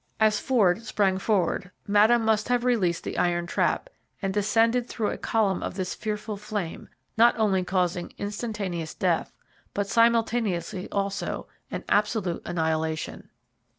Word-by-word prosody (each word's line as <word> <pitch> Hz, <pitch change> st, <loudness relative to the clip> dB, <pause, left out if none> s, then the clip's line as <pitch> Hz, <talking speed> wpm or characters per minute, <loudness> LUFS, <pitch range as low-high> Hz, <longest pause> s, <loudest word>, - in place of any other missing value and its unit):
As 215 Hz, -1 st, +4 dB
Ford 215 Hz, -6 st, +2 dB
sprang 195 Hz, -4 st, +1 dB
forward 185 Hz, -3 st, 0 dB, 0.2 s
Madame 220 Hz, +3 st, +4 dB
must 220 Hz, -1 st, +2 dB
have 245 Hz, -1 st, +2 dB
released 195 Hz, -9 st, +1 dB
the -, -, -3 dB
iron 175 Hz, -1 st, +1 dB
trap 175 Hz, -, 0 dB, 0.3 s
and 195 Hz, -1 st, -2 dB
descended 225 Hz, +4 st, +2 dB
through 220 Hz, -3 st, -1 dB
a -, -, -4 dB
column 205 Hz, -5 st, +1 dB
of -, -, -4 dB
this 185 Hz, -2 st, -2 dB
fearful 210 Hz, 0 st, -4 dB
flame, 205 Hz, -4 st, -5 dB, 0.3 s
not 235 Hz, +1 st, +6 dB
only 200 Hz, -4 st, +2 dB
causing 180 Hz, -1 st, -1 dB
instantaneous 205 Hz, -6 st, -4 dB
death, 175 Hz, -3 st, 0 dB, 0.4 s
but 200 Hz, -, 0 dB
simultaneously 225 Hz, -5 st, +1 dB
also 200 Hz, 0 st, -2 dB, 0.2 s
an -, -, -5 dB
absolute 205 Hz, -4 st, +1 dB
annihilation. 160 Hz, -2 st, -2 dB
205 Hz, 135 wpm, -26 LUFS, 180-220 Hz, 0.4 s, not